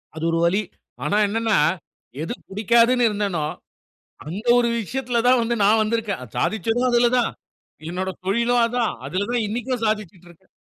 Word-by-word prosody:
அது 160 - -6
ஒரு 165 - +1
வலி. 195 +5 +2 0.4
ஆனா 205 - +1
என்னன்னா, 225 +1 +1 0.7
எது 170 - -3 0.2
புடிக்காதுன்னு 235 +4 +3
இருந்தனோ, 200 -7 -1 0.8
அந்த 195 +7 -5 0.2
ஒரு 235 -1 +2
விஷயத்தில 245 +1 -2
தான் 255 -1 +5
வந்து 235 +1 0
நான் 215 +2 +4
வந்திருக்கேன். 215 - -2
அ - - -8
சாதிச்சதும் 225 - 0
அதுல 240 0 +4
தான். 235 - 0 0.6
என்னோட 185 +2 -3 0.2
தொழிலும் 235 +4 +2
அதான். 235 -1 -1
அதுல 195 +3 -2
தான் 240 -2 0
இன்னைக்கும் 240 +2 -3
சாதிச்சுட்டுருக்கேன். 185 -4 -5
220 Hz, 145 wpm, -22 LUFS, 195-235 Hz, 0.8 s, தான்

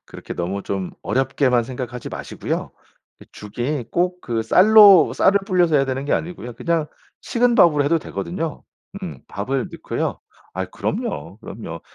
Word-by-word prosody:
그렇게 - - -9
너무 95 +3 -3
좀 95 -2 -3
어렵게만 130 -2 +1
생각하지 125 -1 -6
마시고요. - - -4 0.5
그 - - -16
죽이 120 +6 -4
꼭 180 +1 0
그 115 -6 -2
쌀로 200 - +7
쌀을 200 +1 +3
불려서 175 -5 +3
해야 135 - +3
되는 135 0 -3
게 145 - -1
아니고요. 155 -8 -3
그냥 165 +4 -1 0.3
식은 240 0 +1
밥으로 155 - +5
해도 165 +3 +2
되거든요. 165 0 -5 0.4
음 180 - -7
밥을 130 +6 -3
넣고요. - - -3 0.3
아 - - -2
그럼요. 80 +7 -4
그럼요. 100 -7 -8
135 Hz, 325 characters per minute, -21 LUFS, 115-175 Hz, 0.5 s, 쌀로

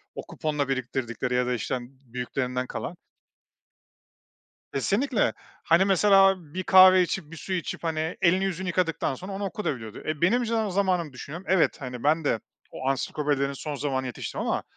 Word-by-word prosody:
O - - -4
kuponla 150 -3 -2
biriktirdikleri 125 -1 -2
ya 125 - +2
da, 125 - +1
işte, 120 - -3
hani, 125 -1 -4 0.2
büyüklerinden 125 +1 -3
kalan. - - -5 1.8
Kesinlikle. 210 - +1 0.3
Hani, 170 +4 +4
mesela 195 0 +5 0.2
bir 185 - -3
kahve 185 0 +8
içip, 175 -3 -2
bir 165 - -9
su 190 - -5
içip, 175 -2 -3
hani, 160 0 -2
elini 185 +2 +4
yüzünü 190 -1 -3
yıkadıktan 165 -5 0
sonra 185 +8 -8
onu 195 +1 -4
okuyabiliyordu 135 - -4
da. - - -4
E, 155 -2 -3
benim 235 +8 +3
jen 225 -2 0
zamanımı 180 -5 0
düşünüyorum, 155 +8 -8
evet, 185 -3 +3
ben 140 +5 0
de 115 - +1 0.3
o 130 - -5
ansiklopedilerin 140 0 0
son 145 +2 -5
zamanına 130 -1 -2
yetiştim 125 - -5
ama - - -1
160 Hz, 165 wpm, -26 LUFS, 130-190 Hz, 1.8 s, kahve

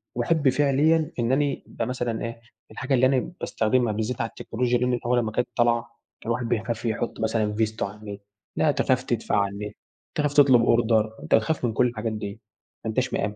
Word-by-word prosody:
وأحب 140 +3 +2
فعليًا 145 +3 +2
إن 120 +2 +1
أنا 140 0 +1
ابقى 115 - -4
مثلًا 120 -3 -2
إيه 115 0 -7 0.3
الحاجة 130 +1 -3
اللي 130 0 +4
أنا 130 +4 +1
باستخدمها 115 0 +1
بالذات 110 +3 -2
على 115 - -1
التكنولوجيا 120 +1 -1
دي 125 - 0
من 125 -1 0
أول 120 0 +3
ما 110 -2 -1
كانت 120 +2 0
طالعة، 120 -1 +3 0.4
كان 115 - -6
الواحد 120 0 -1
بيخاف 115 +1 -2
يحط 115 +1 -2
مثلًا 110 -1 0
فيزته 110 0 -1
على 100 +2 -11
النت، 100 -1 -8 0.3
لأ - - +3
تخاف - - +1
تدفع - - -1
على 100 -1 +1
النت، 105 +1 -6 0.4
تخاف 145 -1 0
تطلب 135 -5 +6
أوردر، 115 -2 +3 0.2
تخاف 125 +4 +2
من 115 - -1
كُلّ 125 +2 +3
الحاجات 115 -1 -3
دي، 105 +1 -6 0.4
ما - - -1
انتاش 130 +3 -1
مآمن، 105 +1 -1
120 Hz, 200 wpm, -25 LUFS, 110-130 Hz, 0.4 s, تطلب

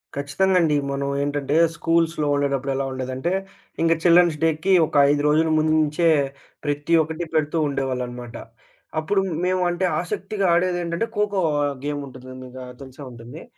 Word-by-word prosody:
ఖచ్చితంగా 145 +7 +1
అండి. 155 -3 +2 0.2
మనం 140 0 -2
ఏంటంటే 145 0 -2 0.2
స్కూల్స్‌లో 165 -2 +1
ఉండేటప్పుడు 140 -1 -1
ఎలా 135 0 -1
ఉండేదంటే, 130 +5 -3 0.5
ఇంక 165 0 +4
చిల్డ్రన్స్ 175 -2 +5
డేకి 165 +4 +2
ఒక - - -9
5 145 0 +2
రోజుల 155 +2 +3
ముందు 155 0 +2
నుంచే 155 +3 +1 0.6
ప్రతి 145 +2 -1
ఒక్కటి 160 +2 -5
పెడుతూ 155 +1 +1
ఉండేవాళ్ళనమాట. 125 -3 -4 0.7
అప్పుడు 195 +5 +1 0.2
మేము 185 0 +1
అంటే, 175 +2 -1 0.2
ఆసక్తిగా 195 +3 -3
ఆడేదెంటంటే 175 +2 0
ఖోఖో 205 -2 +1 0.2
ఆహ్, 145 -1 -1
గేముంటుందండిగా 130 -3 -7 0.2
తెలిసే 135 +1 -11
ఉంటుంది. 120 +6 -11
150 Hz, 135 wpm, -22 LUFS, 135-170 Hz, 0.7 s, చిల్డ్రన్స్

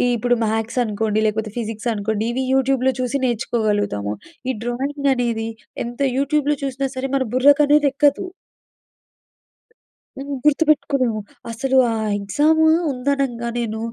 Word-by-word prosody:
ఇప్పుడు 245 +1 +1
మ్యాథ్స్ 225 +3 -1
అనుకోండి 215 0 -1
లేకపోతే 215 0 -2
ఫిజిక్స్ 225 +1 -3
అనుకోండి, 215 +1 -2
ఇవి 260 +1 -1
యూట్యూబ్‍లో 265 -1 +2
చూసి 255 +2 -1
నేర్చుకోగలుగుతాము. 210 - -1 0.4
ఈ - - -3
డ్రాయింగ్ 275 +3 -1
అనేది 230 -2 -1 0.4
ఎంత 240 +3 -7 0.2
యూట్యూబ్‍లో 290 +1 +1
చూసినా 270 0 -2
సరే 265 +1 -2
మన 265 - 0
బుర్రకనేదెక్కదు. 285 +2 +4 1.9
హ్మ్. 280 +1 -4
గుర్తుపెట్టుకోలేము. 280 -6 +2 0.3
అసలు 265 +3 0
ఆ - - -1 0.3
ఎగ్జాము 305 +10 +2 0.2
ఉందనంగా 255 -2 -1
నేను 220 -2 -3
255 Hz, 110 wpm, -20 LUFS, 225-280 Hz, 1.9 s, బుర్రకనేదెక్కదు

